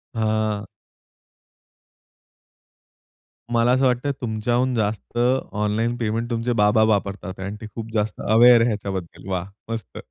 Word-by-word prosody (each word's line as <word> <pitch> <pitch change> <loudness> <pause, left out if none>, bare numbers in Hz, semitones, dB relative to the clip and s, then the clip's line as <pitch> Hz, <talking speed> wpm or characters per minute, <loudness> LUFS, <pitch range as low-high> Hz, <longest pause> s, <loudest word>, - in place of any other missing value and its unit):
हां. 110 -1 0 2.9
मला 120 +1 +3
असं 130 +1 +3
वाटतं 125 +3 +1
तुमच्याहून 120 +2 0
जास्त 110 +1 -2 0.3
ऑनलाईन 105 +3 0
पेमेंट 115 +1 -2
तुमचे 120 +1 -1
बाबा 105 +2 +4
वापरतात 100 -1 -3
आणि 100 +2 -5
ते - - -6
खूप 115 -1 -6
जास्त 105 -1 -1
अवेअर 115 +2 +7
ह्याच्याबद्दल. 100 -5 -4
वाह 90 -1 -1 0.3
मस्त. 115 -1 -6
110 Hz, 115 wpm, -23 LUFS, 105-120 Hz, 2.9 s, अवेअर